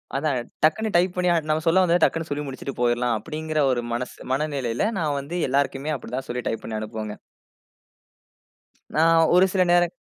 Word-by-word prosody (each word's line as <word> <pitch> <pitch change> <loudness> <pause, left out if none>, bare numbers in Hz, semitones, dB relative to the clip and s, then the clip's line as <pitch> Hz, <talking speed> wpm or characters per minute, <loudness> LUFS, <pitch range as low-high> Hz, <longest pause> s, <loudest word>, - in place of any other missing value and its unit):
அதான், 140 -2 0 0.2
டக்குனடனு 210 +7 +2
டைப் 180 +1 +3
பண்ணி 180 0 +1 0.2
நம்ம 155 0 +1
சொல்ல 185 +3 +5
வந்தது 175 -1 +3
டக்குன்னு 165 0 +1
சொல்லி 145 +1 -2
முடிச்சிட்டு 135 0 -6
போயிர்லாம் 120 0 +2
அப்பிடிங்கிற 155 +6 -4
ஒரு 120 -1 -1
மனசு, 120 +1 -4 0.2
மன 135 - +1
மனநிலையில 135 - -1
நான் 150 -3 0
வந்து 145 +6 -6
எல்லாருக்குமே 140 +2 0
அப்பிடிதான் 130 0 -6
சொல்லி 125 +1 -2
டைப் 115 - -2
பண்ணி 110 -1 -4
அனுப்புவேங்க. 110 -1 -5 1.8
நான் 165 +1 +4
ஒரு 185 - +6
சில 190 - +2
நேரம். 175 0 +4
145 Hz, 165 wpm, -24 LUFS, 125-165 Hz, 1.8 s, ஒரு